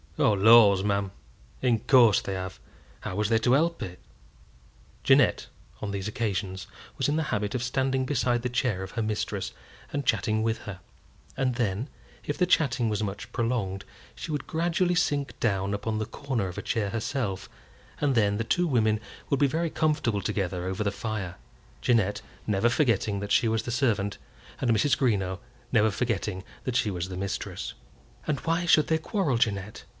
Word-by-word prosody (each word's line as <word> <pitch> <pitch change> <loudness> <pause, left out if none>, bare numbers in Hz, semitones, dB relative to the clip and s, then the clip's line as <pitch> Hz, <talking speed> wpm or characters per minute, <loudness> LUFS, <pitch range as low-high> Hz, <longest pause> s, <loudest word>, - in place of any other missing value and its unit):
"Oh, 110 - +4
laws, 100 -1 +7
ma'am, 100 -1 0 0.5
in 120 -3 +3
course 120 -3 +5
they 100 - -4
have! 95 0 -5 0.4
How - - -5
was 105 +1 0
they 115 -1 +4
to 120 +2 +3
help 165 +4 +2
it?" 90 -1 -6 1.0
Jeannette, - - +4 0.3
on 105 - -3
these 100 0 -3
occasions, 100 -3 -3 0.3
was - - +1
in 145 - +1
the 160 - +1
habit 105 +2 -1
of 125 - -1
standing 130 +1 0
beside 125 -3 +1
the 125 - -1
chair 120 -6 0
of 95 - -7
her 115 - -2
mistress, 110 -1 -2 0.4
and 145 -2 -2
chatting 110 -2 +1
with 115 0 0
her; 100 -3 -8 0.6
and 130 -2 +1
then, 115 0 -1 0.4
if 145 - -3
the 180 - +3
chatting 135 -9 +2
was 105 -1 -1
much 105 +3 -5
prolonged, 115 -6 -1 0.3
she 170 - -6
would 145 -2 -2
gradually 175 +2 +1
sink 145 -5 0
down 100 -3 0
upon 110 +2 -2
the 110 - -1
corner 130 -8 -3
of 90 - -7
a - - -2
chair 105 -2 -1
herself, 115 -4 -3 0.5
and 145 -2 +2
then 105 -4 +2
the 115 - -1
two 175 +10 +1
women 110 -6 +2 0.3
would 140 - +1
be 145 - +5
very 165 +4 -1
comfortable 150 -10 +1
together 95 -3 -2
over 95 +2 -2
the 100 - 0
fire, 100 -4 -4 0.4
Jeannette 105 - +2 0.2
never 105 +2 +2
forgetting 115 -6 +1
that 100 0 -5
she 115 - +4
was 110 0 0
the 120 - -4
servant, 110 -5 0 0.4
and 130 - 0
Mrs. 115 +6 +3
Greenow 95 -7 0 0.3
never 110 -3 +4
forgetting 105 -3 -2 0.2
that 130 - -3
she 110 -4 +2
was 90 0 -3
the 90 - -6
mistress. 100 +1 -4 0.5
"And 150 -2 0
why 165 +1 0
should 155 -2 +5
they 160 - +2
quarrel, 160 - 0
Jeannette? 105 -3 -1
110 Hz, 180 wpm, -27 LUFS, 100-130 Hz, 1.0 s, laws